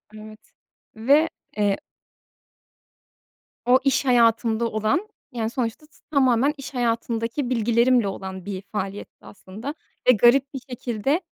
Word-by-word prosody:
Evet 215 0 -11 0.6
ve, 285 +9 +3 0.3
eee 205 -1 +2 1.9
o, 250 +2 +5
iş 275 0 +2
hayatımda 230 -2 +3
olan, 220 - 0 0.2
yani, 225 -2 -2
sonuçta 240 +4 -3
t 305 - -29 0.2
tamamen 265 0 +3
iş 275 0 -8
hayatımdaki 235 +1 -1
bilgilerimle 235 -1 +3
olan 190 -1 -6
bir 195 -2 -5
faaliyetti 200 -1 -6
aslında 215 +9 -8 0.3
ve - - +9
garip 250 +5 +4
bir 270 - -4
şekilde, 245 - -1
235 Hz, 115 wpm, -23 LUFS, 215-260 Hz, 1.9 s, ve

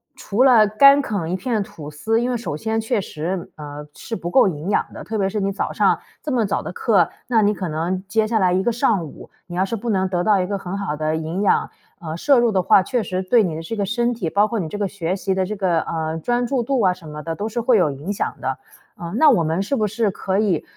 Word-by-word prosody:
除 255 -1 0
了 235 -5 +6
干 275 +7 +6
啃 200 -9 -3
一 - - 0
片 215 +2 -1
吐 150 -6 -10
司 220 +10 0
因 245 - -1
为 - - 0
首 220 -10 -4
先 225 +4 -1
确 225 -1 0
实， 175 +1 -4
呃， 150 0 -8
是 225 - -6
不 175 -1 -5
够 260 - +5
营 165 0 -4
养 - - +2
的。 - - -8
特 220 0 -4
别 195 -1 +1
是 210 +1 -2
你 195 0 0
早 195 - -3
上 - - +2 0.2
这 300 - -3
么 240 -3 +2
早 200 - -1
的 - - -6
课， 195 -6 +2 0.2
那 230 -3 +3
你 205 +1 +3
可 185 -4 -4
能， 175 +5 -2
接 220 +2 +1
下 225 0 +1
来 185 -2 +3
一 185 +1 +1
个 240 - +1
上 225 - +1
午， 145 - -12 0.2
你 175 - -7
要 185 - +2
是 195 +4 -2
不 230 +2 -4
能 190 -2 +1
得 175 -1 0
到 210 -3 +3
一 180 - -2
个 200 0 -2
很 190 -1 -6
好 185 -7 -3
的 155 +1 -1
营 160 +4 -3
养， - - +2 0.3
呃， 160 0 -5
摄 275 +5 +4
入 235 -2 +3
的 190 -2 +2
话， 190 - +6
确 245 +1 -1
实 185 -1 -2
对 220 +4 +3
你 165 -4 -2
的 160 - -5
这 195 +8 -5
个 205 -2 -1
身 235 +3 0
体， 195 -9 -3
包 205 +4 +3
括 230 -1 -2
你 165 - -3
这 205 - -6
个 205 -1 0
学 185 -2 -3
习 190 0 -1
的 190 -1 +1
这 210 +3 -4
个， 180 -4 +1
呃， 160 0 -3
专 240 +8 0
注 255 -1 0
度 260 0 0
啊 185 - +4
什 175 -3 -14
么 150 0 -7
的 165 +1 -4
都 210 - -3
是 230 +2 -3
会 235 -1 +4
有 165 -6 +2
影 145 +8 -5
响 205 - -2
的。 - - -2 0.4
嗯， 170 0 -7
那 310 - +7
我 210 -11 +3
们 160 +4 0
是 210 +8 -1
不 215 -5 +1
是 220 0 0
可 190 +1 -2
以， 195 -7 +1
195 Hz, 305 characters per minute, -21 LUFS, 175-225 Hz, 0.4 s, 那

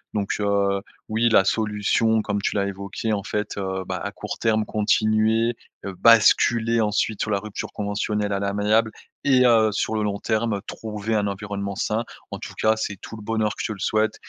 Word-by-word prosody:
donc, 100 -2 -1
heu, 100 -1 +1 0.3
oui, 115 +2 +2
la 115 - +5
solution 110 +1 +1
comme 100 -1 -2
tu - - -1
l'as 100 -1 +1
évoquée, 100 +3 -3
en 100 - -1
fait, 105 0 -3
heu, 95 -1 -3
bah - - -2
à - - -3
court - - -7
terme 110 -1 +1
continuer, 110 +2 +2 0.3
heu, 100 - -4
basculer 115 0 +5
ensuite 105 0 0
sur - - -1
la 100 - +2
rupture 105 0 -6
conventionnelle 105 0 -2
à 100 - 0
l'amiable 105 +3 +1 0.3
et 130 -2 +4
heu, 110 -3 +5
sur 105 - -1
le 110 - 0
long 100 -1 -1
terme 110 -2 0
trouver 110 0 -4
un 105 -1 +1
environnement 100 0 -4
sain. 110 +4 -1 0.3
En - - -5
tout - - -8
cas, 110 0 +3
c'est 105 -2 -3
tout - - -8
le 110 - -10
bonheur 110 -1 0
que - - -5
je - - -1
te 110 - -3
le 95 - -12
souhaite 110 +2 +1
105 Hz, 200 wpm, -23 LUFS, 100-110 Hz, 0.3 s, la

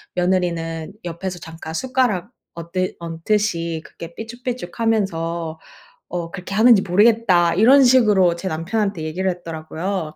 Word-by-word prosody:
며느리는 170 -3 -1
옆에서 175 +2 -5
잠깐 160 -1 -9
숟가락 245 -3 0 0.2
얹드 170 +2 -3
얹듯이 170 -1 -1
그렇게 170 0 -10
삐죽삐죽하면서 200 -8 -3 0.5
어, 170 -1 -4
그렇게 195 0 -6
하는지 225 -2 +6
모르겠다." 195 -3 +4
이런 260 +7 +6
식으로 210 -9 +4
제 180 +3 -5
남편한테 175 +2 -2
얘기를 180 +5 -1
했더라고요. 165 0 -5
180 Hz, 330 characters per minute, -21 LUFS, 165-215 Hz, 0.5 s, 하는지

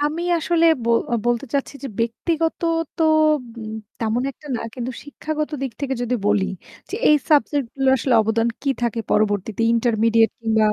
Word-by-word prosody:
আমি 300 +3 -1 0.2
আসলে 335 +1 +1 0.2
ব - - -5 0.4
বলতে 240 +2 +1
চাচ্ছি 280 0 -1
যে - - -3
ব্যক্তিগত 320 +8 -1 0.4
তো 335 - 0 1.0
তেমন 225 +2 0
একটা 285 +3 -16
না - - -5
কিন্তু 250 0 -4
শিক্ষাগত 305 +1 -4
দিক 265 -3 -3
থেকে 270 -2 -1
যদি 245 +1 0
বলি 210 -2 +3 0.5
যে - - -3
এই 300 - +7
সাবজেক্ট 285 -2 +3
গুলো 270 -1 +1
আসলে 255 +1 +1
অবদান 225 +2 +1
কি 280 - +1
থাকে 235 -1 0
পরবর্তীতে 210 0 +1
ইন্টারমিডিয়েট 230 -1 +3
কিংবা 220 -1 +2
240 Hz, 155 wpm, -21 LUFS, 225-290 Hz, 1.0 s, এই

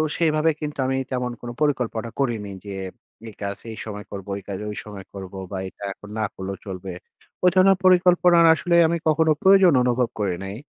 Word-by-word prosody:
সেইভাবে 160 -1 +2
কিন্তু 150 -1 -5
আমি 130 - 0
তেমন 125 -1 -2
কোনো 120 0 -6
পরিকল্পনা 120 -6 0
করিনি। 115 -7 -1
যে 100 - -6 0.5
এই - - -13
কাজ 100 0 -3
এই 110 - -9
সময় 105 -1 -7
করবো, 100 -1 -7
এই 100 - -16
কাজ 100 - -3 0.3
সময় 100 -3 -9
করবো 95 -1 -8
বা 95 - -3
এটা 100 - -15
এখন 105 - -14
না - - +1
করলেও 95 0 -5
চলবে। 95 -1 -6 0.5
ওই 180 - +7
ধরনের 190 +1 +5
পরিকল্পনার 180 -2 +5
আসলে 170 +2 0
আমি 170 - 0
কখনো 155 0 +3
প্রয়োজন 190 -3 +6
অনুভব 125 -1 +1
করি 95 -3 0
নাই। 95 +1 -6
125 Hz, 185 wpm, -23 LUFS, 100-160 Hz, 0.5 s, ওই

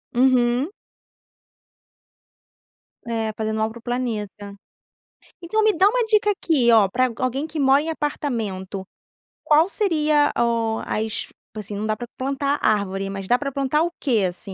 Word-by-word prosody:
Uhum. 250 +3 +3 2.4
É, 225 -2 -2
fazendo 220 0 -2
algo 220 0 -1
para 235 - -10
o - - -20
planeta, 210 -5 -4 0.9
então, 430 +6 0
me 430 - +5
dá 385 +4 +6
uma 485 +3 +2
dica 425 -1 +3
aqui, 300 -11 +2
ó, 220 -4 +6
pra 255 +5 +1
alguém 265 +4 -1
que 315 0 -5
mora 275 0 +4
em 320 - -4
apartamento, 220 -11 -3 0.6
qual 310 +5 +4
seria, 305 -8 +2
ó, 230 -1 +1
as 220 +1 -3 0.3
assim, 210 -1 -6
não 210 +2 -3
dá 215 - 0
pra 240 - -7
plantar 275 +2 -1
árvore, 195 -2 0
mas 195 -1 -6
dá 245 - +4
pra 280 -1 -3
plantar 275 +2 0
o 345 - -1
que, 235 -7 +1
assim, 180 +2 -6
245 Hz, 155 wpm, -22 LUFS, 215-295 Hz, 2.4 s, dá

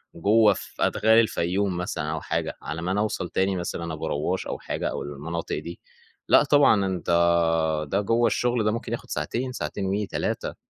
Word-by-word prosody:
جوّه 105 +4 +4
في - - -9
أدغال 110 +1 +4
الفيوم 95 -3 0
مثلًا 80 -3 -3
أو 80 - -3
حاجة، - - -3
على 80 +2 -5
ما 90 +2 -2
أنا 100 - 0
أوصل 105 -4 -2
تاني 95 0 0
مثلًا 85 -2 -4
أبو 75 - -4
رواش، 80 +6 -2
أو - - -4
حاجة - - -3
أو - - -4
المناطق 75 +3 -4
دي 85 +3 -8 0.5
لأ، - - +6
طبعًا 140 -9 +4
أنتَ 90 -3 -3 0.8
ده 100 +2 +2
جوّه 115 +3 +2
الشغل 120 0 +1
ده 105 - +2
ممكن 115 - -4
ياخد - - -5
ساعتين، 120 +12 -2
ساعتين 95 0 -4
و 100 +2 -1
3. - - -3
95 Hz, 185 wpm, -25 LUFS, 85-110 Hz, 0.8 s, لأ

